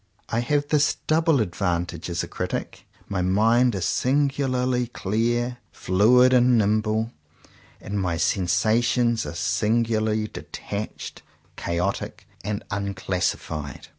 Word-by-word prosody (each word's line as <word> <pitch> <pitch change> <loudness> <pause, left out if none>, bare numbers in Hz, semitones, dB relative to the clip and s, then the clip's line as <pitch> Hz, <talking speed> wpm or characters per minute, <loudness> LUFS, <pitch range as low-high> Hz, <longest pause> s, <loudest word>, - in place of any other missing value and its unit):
I 115 - 0
have 145 +4 0
this 150 -1 +3
double 160 -3 +3
advantage 90 -3 -2
as 85 0 -2
a - - -5
critic. - - -5 0.2
My 100 -2 -2
mind 115 +6 +3
is 90 -2 -2
singu 140 +1 +1
larly 125 -1 0
clear, 120 +5 -1
fluid, 125 +7 +4
and 125 -1 +5
nimble; 110 +1 +1 0.7
and 100 +1 -3
my 90 -3 -1
sensa 95 +7 +2
tions 120 -5 +1
are 75 - -6
singularly 110 +3 +1
detached, 105 0 -7 0.3
chaotic, 90 +3 -3 0.2
and 105 +1 -3
unclassified. 95 -7 -3
110 Hz, 115 wpm, -24 LUFS, 95-125 Hz, 0.7 s, and